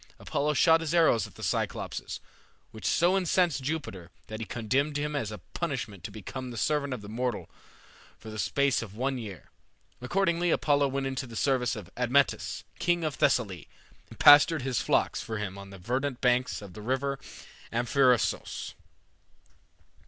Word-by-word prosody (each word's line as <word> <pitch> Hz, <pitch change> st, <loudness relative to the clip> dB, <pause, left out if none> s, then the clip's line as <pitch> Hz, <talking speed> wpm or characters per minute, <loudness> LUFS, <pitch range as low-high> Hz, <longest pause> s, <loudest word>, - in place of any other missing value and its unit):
Apollo 150 Hz, +1 st, -1 dB
shot 165 Hz, +2 st, +5 dB
his 165 Hz, +1 st, -1 dB
arrows 160 Hz, -, +4 dB
at -, -, -18 dB
the -, -, -10 dB
Cyclopes, -, -, -3 dB, 0.5 s
which 110 Hz, -, -5 dB
so 175 Hz, +3 st, +3 dB
incensed 180 Hz, -5 st, +2 dB
Jupiter 130 Hz, -, -4 dB, 0.2 s
that 110 Hz, 0 st, -7 dB
he 115 Hz, -, -5 dB
condemned 135 Hz, +6 st, 0 dB
him 150 Hz, +1 st, -2 dB
as 115 Hz, -7 st, -2 dB
a 105 Hz, -, -6 dB, 0.2 s
punishment 100 Hz, -5 st, -4 dB
to -, -, -5 dB
become 125 Hz, +5 st, -7 dB
the 120 Hz, -, -7 dB
servant 140 Hz, +3 st, 0 dB
of 115 Hz, -5 st, -5 dB
a -, -, -8 dB
mortal 120 Hz, +1 st, -3 dB, 0.7 s
for 110 Hz, -, -10 dB
the 110 Hz, -, -6 dB
space 140 Hz, +8 st, +1 dB
of 105 Hz, -3 st, -8 dB
one 130 Hz, +2 st, -1 dB
year. 100 Hz, -6 st, -9 dB, 0.5 s
Accordingly 175 Hz, +4 st, +1 dB
Apollo 145 Hz, -3 st, +3 dB
went 135 Hz, 0 st, -2 dB
into 135 Hz, 0 st, -3 dB
the 115 Hz, -, -10 dB
service 125 Hz, -2 st, +1 dB
of 105 Hz, -5 st, -9 dB
Admetus, 125 Hz, +3 st, +1 dB, 0.2 s
king 175 Hz, -1 st, +1 dB
of 155 Hz, -2 st, -1 dB
Thessaly, 100 Hz, -, +1 dB, 0.4 s
and -, -, -13 dB
pastured 145 Hz, 0 st, +7 dB
his 130 Hz, -3 st, 0 dB
flocks -, -, +1 dB
for 110 Hz, -, -4 dB
him 105 Hz, -2 st, -4 dB
on 100 Hz, 0 st, -10 dB
the 100 Hz, -, -10 dB
verdant 125 Hz, +7 st, -2 dB
banks 125 Hz, -3 st, +1 dB
of 95 Hz, -3 st, -10 dB
the 105 Hz, -, -9 dB
river 135 Hz, +4 st, -1 dB, 0.5 s
Amphrysos. 125 Hz, +1 st, +1 dB
130 Hz, 165 wpm, -28 LUFS, 110-145 Hz, 0.7 s, pastured